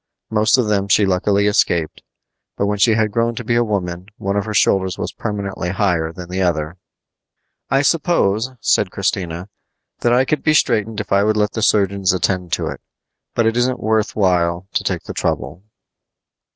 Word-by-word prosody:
Most 110 +3 +3
of 125 -4 +1
them 100 -2 0
she 100 +1 +4
luckily 100 +2 +1
escaped; 85 -5 +1 0.6
but 100 - +1
when 105 0 -1
she 110 +1 +4
had 110 -1 +1
grown 115 +1 0
to 120 - -5
be 120 - -1
a 120 0 +3
woman 90 -4 -3
one 100 +1 -2
of 100 - 0
her 110 - -4
shoulders 95 -2 +2
was - - -4
permanently 100 -4 -4
higher 90 -4 0
than 90 0 -9
the 95 +2 -3
other. 85 -1 -1 0.9
"I 135 +1 +2
suppose," 130 - +1
said 100 - +2
Christina, 90 -2 -3 0.5
"that 120 - +1
I 125 +2 +4
could 150 +1 -1
be 155 - +2
straightened 110 -5 +1
if 110 - -6
I 100 0 +4
would 110 +1 +1
let 105 0 +1
the 110 - -4
surgeons 100 -3 +2
attend 90 -1 -1
to - - 0
it; - - -7 0.5
but 115 - +2
it 115 0 +1
isn't 125 +1 +1
worth 110 0 0
while 90 -3 +1
to - - 0
take - - -2
the - - -7
trouble." 90 - -3
100 Hz, 190 wpm, -19 LUFS, 90-110 Hz, 0.9 s, she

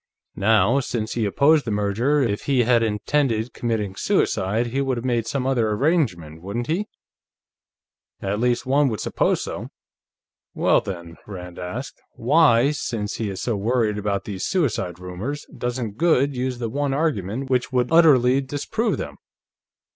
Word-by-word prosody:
Now, 110 +5 +3
since 115 -4 -3
he 115 -2 0
opposed 145 +8 +4
the - - -4
merger, 105 +8 +1
if 105 -4 -2
he 135 -3 +3
had 120 0 +3
intended 115 +2 0
committing 110 -5 -2
suicide, 100 +4 +1
he 130 +4 -1
would 135 -2 -1
have 120 - -5
made 120 -3 0
some 135 -2 -2
other 120 -5 +1
arrangement, 105 - 0
wouldn't 100 +6 -4
he? 180 - -1 1.3
At 100 +2 -2
least, 125 +1 +1
one 140 +2 +3
would 110 -4 -3
suppose - - 0
so. - - -5 0.9
Well, - - +3
then," 85 -3 -7
Rand 90 -3 -8
asked, 115 +10 -6
"why, 135 0 +4
since 110 -7 -3
he 110 -3 -2
is 95 - -5
so 120 - 0
worried 110 0 0
about 100 -1 -2
these 95 -3 -5
suicide 115 - -1
rumors, 90 +11 -5
doesn't 120 -4 -3
Goode 145 -5 +3
use 125 0 -2
the 120 -1 -3
one 140 +3 -1
argument 135 - -1
which 125 0 +1
would 125 +1 0
utterly 135 -6 +5
disprove 145 - -2
them? - - -6
120 Hz, 155 wpm, -23 LUFS, 105-135 Hz, 1.3 s, utterly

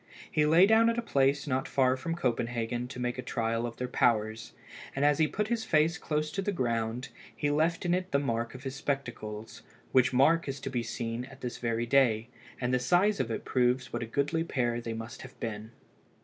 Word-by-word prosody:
He 150 -1 +3
lay 165 +5 +7
down 220 +2 +5
at 230 - 0
a - - +1
place 140 -7 +2
not 130 -2 -1
far 130 -1 +3
from 165 +6 -3
Copenhagen 120 -4 -1
to 125 0 -8
make 125 0 -2
a - - -1
trial 115 -1 -1
of 115 - -8
their 125 - -2
powers, 115 -2 +1 0.4
and 140 +1 +1
as 145 +1 +3
he 155 - +4
put 210 +6 -2
his 235 -2 0
face 160 -1 +2
close 155 0 -1
to 195 - -2
the 205 - -1
ground, 120 - -1 0.3
he 145 - 0
left 165 +4 +1
in 175 - +2
it 185 +1 -1
the 140 - +3
mark 115 -3 -2
of 130 - -10
his 135 -1 -4
spectacles, 120 -6 -4 0.3
which 130 -1 +4
mark 150 +6 +4
is 135 0 -4
to 135 - -4
be 125 -2 0
seen 115 +1 -4
at 135 +1 -14
this 125 -2 -5
very 115 -1 -1
day, 120 -3 +3 0.3
and 125 0 -1
the 125 - +3
size 185 +10 +3
of 120 - 0
it 115 - -4
proves 125 0 +1
what 120 - -2
a 120 - -3
goodly 145 +7 0
pair 120 -7 -1
they 115 -1 -4
must 115 +2 -7
have 130 - -12
been. 110 -1 -5
130 Hz, 220 wpm, -30 LUFS, 120-150 Hz, 0.4 s, lay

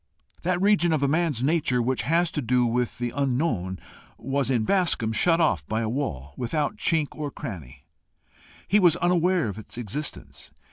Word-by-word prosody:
That 180 0 0
region 190 -4 +3
of 150 -3 +1
a - - +3
man's 150 -4 0
nature 145 -4 +1
which 125 +2 0
has 165 +2 +1
to 150 - -2
do 125 0 +2
with 120 +1 -1
the 120 -1 -3
unknown 125 - -1 0.4
was 135 0 -1
in 120 -4 +1
Bascombe 170 - +1
shut 165 +10 +3
off 125 - +2
by 110 +1 -1
a 110 - -1
wall 70 - -4
without 150 - -2
chink 160 -7 +1
or 150 -1 -5
cranny; 80 - -9 0.8
he 210 - +4
was 175 -5 +5
unaware 175 -3 +2
of 100 0 -5
its 110 - -11
existence. 95 - -6
135 Hz, 175 wpm, -25 LUFS, 115-165 Hz, 0.8 s, was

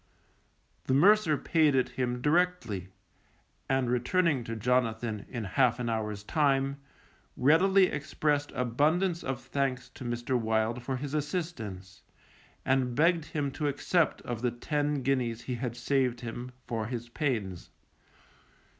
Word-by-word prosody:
The 130 - +2
mercer 180 0 +5
paid 155 -3 +2
it 130 - +2
him 125 -1 -2
directly, 155 - +1 0.8
and 135 -1 +2
returning 130 +4 +1
to 115 - -4
Jonathan 115 -2 0
in 120 -3 -4
half 120 +4 +2
an 120 -1 -2
hour's 105 -2 -3
time, 140 0 +1 0.6
readily 185 +8 +5
expressed 145 -2 -1
abundance 155 +9 +1
of 130 -2 -3
thanks 135 0 -2
to - - -11
Mr. 120 +1 -2
Wild 110 +1 0
for 130 +2 -3
his 140 +2 -5
assistance, 130 - -4 0.6
and 130 -2 +1
begged 165 +2 +3
him 145 -3 -2
to 150 +2 -2
accept 155 +3 +1
of 120 -2 -4
the 125 - +2
ten 145 +3 -1
guineas 120 -3 0
he 125 - -3
had 120 -1 -4
saved 125 -1 0
him, 120 +1 -6
for 110 -3 -3
his 120 -1 -5
pains. 115 - -2
130 Hz, 135 wpm, -29 LUFS, 120-150 Hz, 0.8 s, mercer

